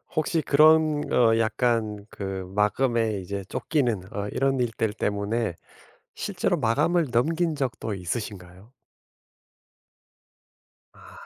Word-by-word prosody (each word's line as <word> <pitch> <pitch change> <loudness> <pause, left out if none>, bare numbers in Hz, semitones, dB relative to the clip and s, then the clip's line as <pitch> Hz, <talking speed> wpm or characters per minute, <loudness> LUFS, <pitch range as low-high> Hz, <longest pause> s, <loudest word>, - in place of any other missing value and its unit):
혹시 155 +1 +1
그런 155 +1 +4
어 115 -2 +4
약간 110 -2 0
그 95 -2 -5
마감에 110 0 +1
이제 100 +2 -5
쫓기는 125 - 0
어 100 0 -3
이런 135 +2 0
일들 115 -3 -1
때문에 105 -1 -1 0.6
실제로 190 -3 -1
마감을 150 +8 +2
넘긴 160 +7 +1
적도 115 -6 -3
있으신가요? 95 +2 -6 2.2
아. - - -16
115 Hz, 215 characters per minute, -25 LUFS, 105-140 Hz, 2.2 s, 그런